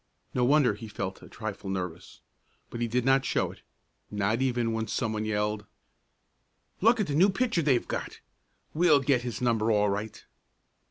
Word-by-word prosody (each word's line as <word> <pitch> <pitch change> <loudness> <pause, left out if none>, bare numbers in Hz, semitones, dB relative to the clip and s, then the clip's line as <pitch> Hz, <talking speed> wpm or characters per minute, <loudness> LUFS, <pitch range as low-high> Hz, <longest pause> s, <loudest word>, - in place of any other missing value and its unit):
No 125 - +1
wonder 135 -2 +4
he 110 +2 -9
felt 95 -2 -5
a - - -13
trifle 105 -3 -6
nervous, 90 -2 -5 0.5
but 120 - -5
he 120 - +1
did 125 +2 0
not 135 0 +4
show - - 0
it, - - -16 0.5
not 105 +4 0
even 120 -3 +1
when 110 0 -2
some 110 0 -1
one 110 0 -2
yelled: 105 -1 -1 1.1
"Look 230 +4 +5
at 210 - +2
the 145 - -3
new 180 +7 +5
pitcher 230 -2 +1
they've 135 -6 +2
got! - - -4 0.5
We'll 155 -3 +4
get 130 -2 +2
his 120 -1 -5
number 115 -2 +2
all 105 -1 +3
right." 105 +2 -5
115 Hz, 175 wpm, -28 LUFS, 105-135 Hz, 1.1 s, Look